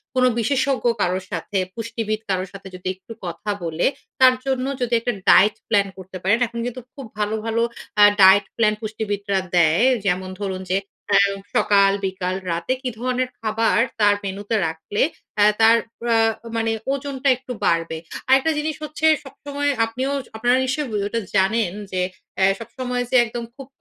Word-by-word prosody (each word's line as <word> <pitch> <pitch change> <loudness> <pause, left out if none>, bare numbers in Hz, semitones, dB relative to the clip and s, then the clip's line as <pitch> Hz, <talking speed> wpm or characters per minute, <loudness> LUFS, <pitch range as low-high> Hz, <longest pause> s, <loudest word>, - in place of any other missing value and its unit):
কোন 255 - +3 0.2
বিশেষজ্ঞ 265 +3 0 0.2
কারোর 185 +1 0
সাথে 205 - -3 0.2
পুষ্টিবিদ 225 -1 -3
কারো 185 -1 0
সাথে 195 0 -10
যদি 180 0 -8
একটু 190 +5 -12
কথা 170 +4 -6
বলে, 165 0 -1 0.3
তার 260 -1 +7
জন্য 260 -1 0 0.2
যদি 245 -1 -1
একটা 240 +1 -2 0.2
ডায়েট 205 +2 +6
প্ল্যান 200 -3 +3
করতে 190 0 -9
পারেন। 200 +5 +3
এখন 235 +1 -7
কিন্তু 245 +1 -5
খুব 275 - -8
ভালো, 210 +1 0
ভালো 225 0 0 0.4
আ - - +10 0.2
ডায়েট 190 +1 +7
প্ল্যান 215 -2 +3
পুষ্টিবিদরা 205 -2 -2 0.2
দেয় 170 +5 +4 0.2
যেমন 185 0 0
ধরুন 190 -2 -3
যে 190 - +3 0.4
আ - - +8 0.4
সকাল, 200 -1 +4
বিকাল, 185 -1 -2 0.2
রাতে 170 +9 -1
কী 260 - -2
ধরনের 255 +1 -1
খাবার 225 0 +1 0.2
তার 205 -1 +5
মেনুতে 200 +3 -3
রাখলে 160 +6 -3 0.4
অ্যা 205 - +5 0.2
তার 225 +1 +7 0.4
আ - - +4 0.4
মানে 225 0 0 0.2
ওজনটা 275 -1 -2
একটু 255 0 -10
বাড়বে? 165 -1 +1 0.3
আরেকটা 270 +4 +4
জিনিস 305 0 -2
হচ্ছে 305 +1 -3 0.2
সবসময় 285 +1 -4 0.2
আপনিও 255 +5 -3 0.3
আপনারা 245 +3 +3
নিশ্চয়ই 255 -6 -2
ওটা 230 +3 -2 0.2
জানেন। 195 0 +2 0.2
যে 185 -1 -1 0.4
এ - - +6
সবসময় 250 +1 -3
যে - - +1
একদম 235 +1 -5
খুব 275 -1 -10
220 Hz, 160 wpm, -22 LUFS, 190-255 Hz, 0.4 s, আ